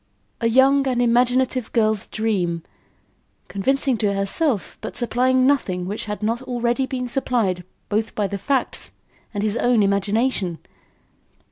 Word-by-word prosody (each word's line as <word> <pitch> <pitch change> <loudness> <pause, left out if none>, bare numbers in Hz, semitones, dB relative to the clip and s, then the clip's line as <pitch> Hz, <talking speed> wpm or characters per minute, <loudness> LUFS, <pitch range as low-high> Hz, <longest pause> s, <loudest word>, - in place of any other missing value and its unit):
a 230 - +1
young 270 +3 +4
and 250 -2 0
imaginative 245 +1 +2
girl's 220 -3 +2
dream, 180 -7 -1 0.8
convincing 265 +5 0
to 205 -2 0
herself 200 - 0
but - - -6
supplying 255 +2 +2
nothing 190 -10 +1
which 205 +4 -4
had 210 -1 -5
not 230 +3 0
already 245 0 -1
been 250 -1 -3
supplied 230 -8 0 0.2
both 215 +1 -1
by 210 - 0
the 200 0 -3
facts 270 +5 -1 0.4
and 205 -1 -3
his 215 +1 0
own 240 -3 +3
imagination! 200 -1 +1
230 Hz, 135 wpm, -22 LUFS, 200-255 Hz, 0.8 s, young